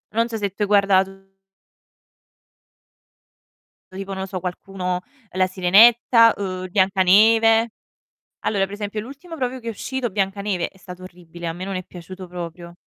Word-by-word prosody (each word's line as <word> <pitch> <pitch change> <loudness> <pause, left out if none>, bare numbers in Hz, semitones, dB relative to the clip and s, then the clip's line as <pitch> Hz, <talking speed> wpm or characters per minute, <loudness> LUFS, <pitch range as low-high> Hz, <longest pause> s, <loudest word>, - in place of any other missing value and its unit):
Non 230 +1 +2
so 225 - -4
se 205 -2 -2
tu 200 - -12
hai - - 0
guardato 195 -1 +4 2.8
Tipo 195 +1 -7
non 190 - -5
lo 190 - -4
so 190 -1 -5
qualcuno 180 0 -4 0.3
La 185 0 +1
Sirenetta, 225 +5 +5
uhm, 185 -2 -4
Biancaneve. 215 +4 +4 0.7
Allora 200 -2 0
per 195 +1 -7
esempio 205 +1 -4
l'ultimo 285 +9 -10
proprio 255 -1 -3
che 235 -2 -8
è - - -1
uscito, 250 +2 -4
Biancaneve, 195 -1 -2
è 190 - -24
stato 185 -1 -11
orribile, 175 -2 -10
a 165 - -2
me 175 +3 -7
non 195 0 -5
è 185 - -5
piaciuto 185 +2 -10
proprio. 170 0 -8
195 Hz, 155 wpm, -22 LUFS, 185-220 Hz, 2.8 s, Sirenetta